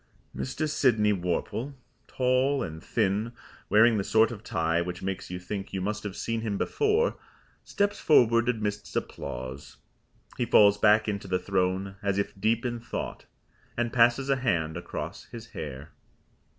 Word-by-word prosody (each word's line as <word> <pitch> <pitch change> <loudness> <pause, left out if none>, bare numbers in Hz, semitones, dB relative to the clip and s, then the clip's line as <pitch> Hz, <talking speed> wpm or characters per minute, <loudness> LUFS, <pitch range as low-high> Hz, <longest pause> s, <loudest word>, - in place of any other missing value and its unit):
Mr. 65 - -2
Sydney 115 -8 +3
Worple, 100 +9 -2 0.3
tall 130 +1 +1
and 80 -3 -7
thin, 105 +5 0 0.4
wearing 110 +1 +5
the - - 0
sort 110 +3 +3
of 110 -2 -8
tie 80 -4 0
which 90 +1 -5
makes 95 0 -4
you 90 - -4
think 95 +2 -6
you 95 - -1
must 105 +3 -2
have 100 -2 -6
seen 115 -1 -2
him 105 -3 -2
before, 440 - +1 0.5
steps 205 0 -1
forward 115 -5 +4
amidst 105 -3 -3
applause. 65 +3 -5 0.6
He 120 - +2
falls 105 -1 +6
back 105 +1 +5
into 100 -2 -3
the 90 - +1
throne 95 +1 -1
as 100 -1 0
if 100 - -1
deep 115 +3 +1
in 120 -1 -2
thought, 115 - -6 0.5
and 120 -1 -1
passes 120 +3 +4
a 135 - +3
hand 85 -11 0
across 85 - -6
his 115 -1 -10
hair. 70 -1 -7
105 Hz, 155 wpm, -27 LUFS, 95-120 Hz, 0.6 s, falls